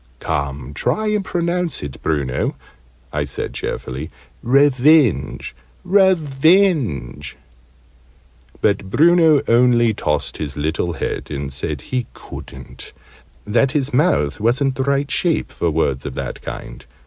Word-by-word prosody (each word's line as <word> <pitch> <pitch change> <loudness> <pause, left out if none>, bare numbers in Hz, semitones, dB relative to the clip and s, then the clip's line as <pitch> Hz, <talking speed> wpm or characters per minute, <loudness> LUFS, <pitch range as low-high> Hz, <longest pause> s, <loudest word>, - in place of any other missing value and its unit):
"Come! 70 -1 -3
Try 215 - 0
and 210 -1 0
pronounce 175 - -2
it, 70 -2 -7
Bruno!" 70 -5 -1 0.6
I 75 0 0
said, 70 - -5
cheerfully. 65 +5 -5 0.3
"Re 140 +4 +5
venge, 140 - +2 0.3
re 190 0 +5
venge." 140 - +1 1.2
But 100 -2 +1
Bruno 160 - +5
only 120 -1 +4
tossed 75 -7 -2
his 75 -3 -5
little 80 +3 -1
head, - - -4
and 70 -2 -4
said 70 +2 -4
he 125 -3 0
couldn't; 65 -1 -10 0.5
that 120 +5 +2
his 140 -1 -1
mouth 75 - +2
wasn't 130 +5 +2
the 135 - -3
right 140 +1 0
shape 170 -3 0
for 85 - -1
words 70 -4 0
of 70 - -6
that - - -5
kind. - - -8
120 Hz, 125 wpm, -19 LUFS, -, 1.2 s, Re